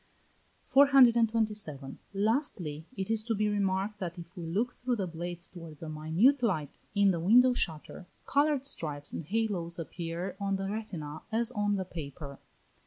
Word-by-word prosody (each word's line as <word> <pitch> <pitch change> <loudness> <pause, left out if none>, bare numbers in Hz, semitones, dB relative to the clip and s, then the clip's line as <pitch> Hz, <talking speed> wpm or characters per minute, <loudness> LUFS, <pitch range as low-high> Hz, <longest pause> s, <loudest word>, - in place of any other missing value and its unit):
427. 225 - +4
Lastly, 200 - -1
it 190 +2 -2
is 225 -1 +2
to 225 0 -1
be 210 +1 +1
remarked 200 0 0
that 175 -2 -4
if 170 0 -10
we 170 -2 -6
look 220 +9 0
through 250 0 -1
the 200 -4 -2
blades 175 0 -5
towards 165 -4 -10
a 160 - -5
minute 165 - +3
light 160 - -1
in 200 -1 +5
the 170 - -1
window 245 +9 +6
shutter, 170 -3 -3 0.2
coloured 285 -1 +2
stripes 145 - -3
and 165 - -5
halos 195 -4 -1
appear 170 +2 -5
on 200 -1 0
the 195 0 -3
retina 175 -8 -5
as 230 +2 +1
on 205 -3 0
the 190 -1 -2
paper. 140 -4 -8
195 Hz, 160 wpm, -30 LUFS, 165-225 Hz, 0.2 s, window